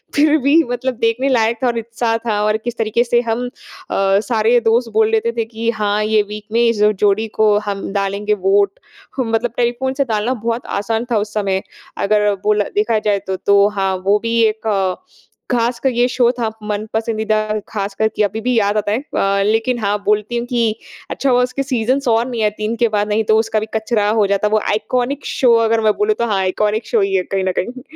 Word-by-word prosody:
फ़िर 305 +1 +4
भी 295 +4 +5
मतलब 255 +1 -2
देखने 230 +4 +1
लायक 230 -2 +2
था - - +3
और 235 -1 0
उत्साह 230 0 -2
था 210 -2 0
और 215 0 +2
किस 240 -1 -4
तरीके 225 +1 +1
से 240 0 +2
हम 235 +2 -1
अ, - - -9 0.8
सारे 230 +1 +3
दोस्त 230 +1 +1
बोल 220 0 +3
लेते 225 +1 +1
थे 230 - 0
कि 225 0 -3
हाँ 210 0 +1
ये 215 0 +3
वीक 210 0 -7
में 235 +1 +2
इस 230 -3 0 0.2
जोड़ी 205 +2 +2
को 210 -1 +4
हम 200 -1 -4
डालेंगे 200 +1 -1
वोट। 200 0 +2 0.4
ह 255 - +2
मतलब 225 +1 -1
टेलीफ़ोन 245 +2 0
से 275 +1 0
डालना 225 +1 -1
बहुत 235 +1 -1
आसान 225 +3 -2
था 225 - +3
उस 210 0 -3
समय 195 -2 0 0.4
अगर 210 0 +2
बोला 210 -1 +2
देखा 215 +1 +2
जाए 205 -1 0
तो। 190 - -1
तो 200 +1 +3
हाँ, 195 -2 -1
वो 205 +2 +3
भी 230 +1 -1
एक 215 -4 0 0.6
ख़ासक 240 0 0
ये 240 +1 +2
शो 245 -1 +2
था 225 -2 0
मनपसंदीदा 215 0 -1
ख़ास 200 -2 -3
कर 220 - +2
के 210 - +2
अभी 210 +2 -2
भी 250 +3 0
याद 205 0 +1
आता 205 -1 -1
है। 220 - +1
अ, 200 -8 0
लेकिन 225 +4 +1
हाँ 205 -1 0
बोलती 210 +3 0
हूँ 235 - -2
कि 245 -2 0 0.5
अच्छा 275 - -1
हुआ 250 -1 +4
उसके 250 +2 -2
सीज़न्स 260 +1 -1
और 230 0 +3
नहीं 235 -3 -3
है 210 - +3
3 215 +2 -2
के - - +5
बाद 210 -1 0
नहीं 220 +1 +1
तो 220 0 +3
उसका 220 -1 0
भी 215 - -4
कचरा 220 -1 0
हो 215 -1 +2
जाता। 200 +1 +1
वो - - +2
आइकॉनिक 245 +6 -1
शो 245 -3 +2
अगर 225 0 +1
मैं 215 -1 +3
बोलूँ 420 +1 +1
तो - - +1
हाँ 205 -3 0
आइकॉनिक 210 +4 -1
शो 225 - +1
ही 195 0 0
है 185 - +1
कहीं 195 - +1
न - - +2
कहीं। 255 +6 -5
220 Hz, 220 wpm, -18 LUFS, 210-235 Hz, 0.8 s, भी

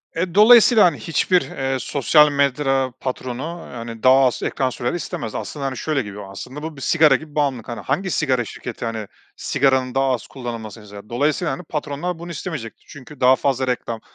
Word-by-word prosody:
Eee, 175 +2 -2
dolayısıyla, 225 0 +7
hani, 155 -6 +2
hiçbir, 175 +6 +2
eee, 135 0 -3
sosyal 150 +3 +4
medya 135 -2 +1
patronu, 130 0 -4 0.3
hani, 115 -1 -8
daha 130 - +7
az 125 - 0
ekran 130 -1 0
süreni 120 +4 -3
istemez. 120 -8 -5
Aslında, 145 -2 -5
hani, 130 -1 -3
şöyle, 150 0 -1
gibi 105 -3 -8
bu 105 - -7
aslında 130 +9 -8
bu 160 -1 -6
bir 135 - -10
sigara 155 -3 +4
gibi 150 +2 -7
bağımlılık. 135 -6 -1 0.2
Hangi 185 +6 0
sigara 130 -6 +1
şirketi, 120 +1 -7
hani, 110 -3 -4 0.3
sigaranın 130 -2 +1
daha 135 -1 +2
az 125 - -4
kullanılmasını 115 -4 -7
ister? 105 +1 -12
Dolayısıyla, 145 +7 0
hani, 180 - -7
patronlar 155 +2 -4
bunu 170 0 -7
istemeyecektir 150 -8 -7
çünkü 145 0 -13
daha 130 +1 +6
fazla 130 -1 0
reklam, 120 -2 -2
135 Hz, 180 wpm, -21 LUFS, 120-150 Hz, 0.3 s, dolayısıyla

